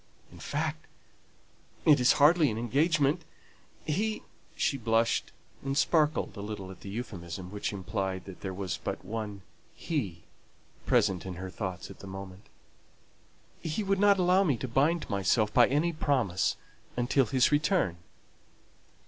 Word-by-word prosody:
In - - -13
fact, - - -3 1.0
it 150 -3 +7
is 125 0 +5
hardly 155 +1 +5
an 110 - -3
engagement 145 +6 +2 0.6
he" 215 +8 -1 0.3
(she - - +1
blushed 115 -2 +1 0.3
and 135 0 -2
sparkled 155 -5 +2
a 100 - -6
little 100 -2 -6
at 95 - -12
the 100 - -8
euphuism, 95 -5 -6
which 105 0 -3
implied 95 -1 -3
that 95 -2 -10
there 95 - -4
was 95 -1 -4
but - - -4
one 105 -1 -5 0.3
"he" 100 - -3 0.6
present 90 -3 +2
in 95 -1 -6
her 95 +1 -6
thoughts 95 -3 -5
at - - -13
the 100 - -10
moment) 95 0 -9 1.3
"would 195 -2 +1
not 205 -1 +5
allow 185 +1 +4
me 145 -10 +1
to 130 - -4
bind 145 +8 +1
myself 105 +2 +1
by 120 -2 +6
any 155 +5 +1
promise 130 - +1 0.4
until 125 +1 +2
his 130 +5 +3
return!" 150 - +2
115 Hz, 140 wpm, -29 LUFS, 95-150 Hz, 1.3 s, it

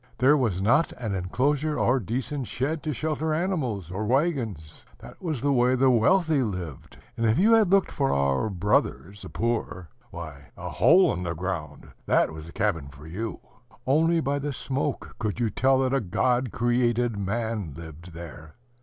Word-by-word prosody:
There 135 +4 +5
was 110 -10 0
not 120 +10 +3
an 110 -5 -4
inclosure 140 - 0
or 130 +2 +2
decent 125 - -3
shed 140 +7 -2
to 155 - -3
shelter 155 +2 -1
animals 130 - -2
or 100 +4 -3
wagons. 120 - -1
That - - -13
was 155 -9 -3
the 145 0 +2
way 125 0 +3
the 130 +1 +4
wealthy 155 - +3
lived; 90 - -5 0.2
and 115 -1 0
if 110 - +3
you 215 +5 +5
had 220 -4 +5
looked 195 0 +3
for 135 -2 0
our 70 +7 +1
brothers, 100 0 0
the 95 - -8
poor, 110 -7 -2 0.2
why, 80 -6 -9
a - - -6
hole 170 - +5
in 90 - -4
the 85 -1 -3
ground, 90 -2 -5 0.2
that - - +3
was 80 0 -9
a - - -10
cabin 85 -9 -1
for 70 +2 -13
you! 105 +8 -5 0.4
Only 165 +5 +3
by 140 -1 -1
the 145 0 -3
smoke 135 +2 -3
could 110 -1 -2
you 115 -3 0
tell 135 0 +3
that 130 0 0
a 135 - +2
God 125 +5 0
created 120 0 +1
man 100 - -3
lived 85 +1 -10
there. 80 -2 -10
120 Hz, 180 wpm, -26 LUFS, 90-140 Hz, 0.4 s, There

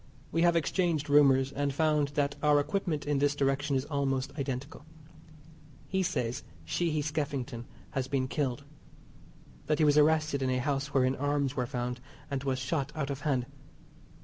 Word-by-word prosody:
We 165 - +1
have 170 0 +4
exchanged 165 -3 0
rumours, 135 -2 +5
and 140 0 -1
found 150 0 +2
that 140 -1 +1
our 150 -1 +5
equipment 160 -1 -1
in 145 -1 +1
this 145 0 +2
direction 140 0 +1
is 130 +1 0
almost 135 -3 -1
identical. 140 +1 -4 1.0
He 190 0 0
says 125 -7 -1 0.2
Sheehy 155 - 0
Skeffington 140 -5 -3 0.2
has 135 -3 -2
been 135 -1 0
killed. 140 -1 -2 1.0
That 150 - +2
he 155 - +4
was 150 0 +5
arrested 155 -2 +3
in 130 - +1
a 130 - +1
house 140 +2 -1
wherein 130 -1 +2
arms 145 -1 0
were 125 -2 -1
found, 125 0 -3 0.3
and 135 -1 -2
was 135 -2 0
shot 135 +2 -2
out 145 -3 -2
of 135 - -4
hand. 135 -5 0
140 Hz, 165 wpm, -30 LUFS, 135-150 Hz, 1.0 s, rumours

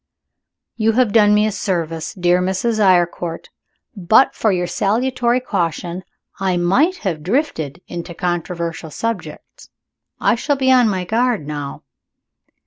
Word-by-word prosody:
"You 225 0 +2
have 240 -3 +2
done 210 -2 +5
me 210 0 +3
a 215 - 0
service, 165 -5 -3
dear 180 -1 +2
Mrs. 190 +5 -1
Eyrecourt. 175 -3 +1 0.5
But 205 +7 +4
for 220 - +1
your 180 -2 0
salutory 240 +6 0
caution, 180 -5 -3 0.4
I 190 -2 0
might 260 - +2
have 165 -5 -1
drifted 180 - -2
into 170 0 -7
controversial 170 -2 -3
subjects. 230 - -6 0.5
I - - +3
shall 285 +5 0
be 260 -1 +2
on 250 -3 +5
my 185 -3 -2
guard 230 - 0
now." 145 -2 -6
190 Hz, 135 wpm, -19 LUFS, 175-230 Hz, 0.5 s, done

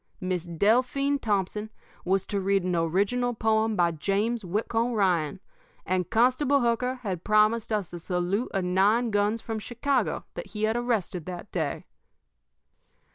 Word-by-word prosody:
Miss 185 -2 -2
Delphine 250 - +2
Thompson 210 0 -1 0.3
was 190 +1 +1
to 200 -1 -2
read 195 0 +1
an 180 -1 0
original 200 +9 +1
poem 220 0 +1
by 175 -2 +3
James 205 +8 -1
Whitcomb 225 +6 -1
Ryan, 180 -8 +1 0.5
and 185 -1 -1
Constable 255 +4 +3
Hooker 240 +2 +1
had 185 -5 -3
promised 215 +2 +3
us 205 -5 -2
a 175 - -5
salute 180 +6 -1
of 195 -2 -1
nine 205 +6 +2
guns 205 +2 +1
from 225 -1 -4
Chicago 250 +5 -1
that - - -6
he 210 0 -5
had 220 +1 +2
arrested 220 -8 -1
that 180 +2 -7
day. 155 -6 -2
210 Hz, 145 wpm, -27 LUFS, 185-230 Hz, 0.5 s, by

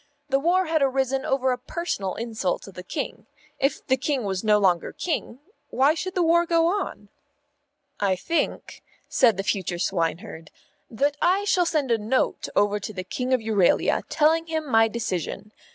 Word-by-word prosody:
The 270 0 +2
war 360 +5 +2
had 320 -2 0
arisen 265 0 +1
over 265 -1 +1
a 250 - -2
personal 250 - -3
insult 220 -5 -2
to 195 - -10
the 180 - -9
King. 280 - -5 0.3
If 275 - 0
the 260 -1 +2
King 265 -1 -1
was 190 -1 -2
no 210 -1 +4
longer 185 -4 +2
King, 315 -8 -3 0.3
why 275 +4 +3
should 365 +4 -5
the 360 - +2
war 340 +1 +3
go 330 -1 +3
on? 390 +5 -2 0.9
"I 195 -2 +2
think," 330 - -2 0.3
said 230 -7 +3
the 195 - -2
future 185 -3 -1
swineherd, 170 -1 -2 0.4
"that 280 +6 0
I 375 +3 +3
shall 365 -4 +2
send 290 -7 0
a 230 - +3
Note 225 +5 -1
over 205 0 +2
to 205 - -6
the 185 -3 -5
King 250 +7 -4
of 255 -2 +3
Euralia, 210 -5 +2
telling 320 +2 +2
him 315 -2 -3
my 225 -3 +4
decision. 210 -2 -4
255 Hz, 175 wpm, -24 LUFS, 205-315 Hz, 0.9 s, no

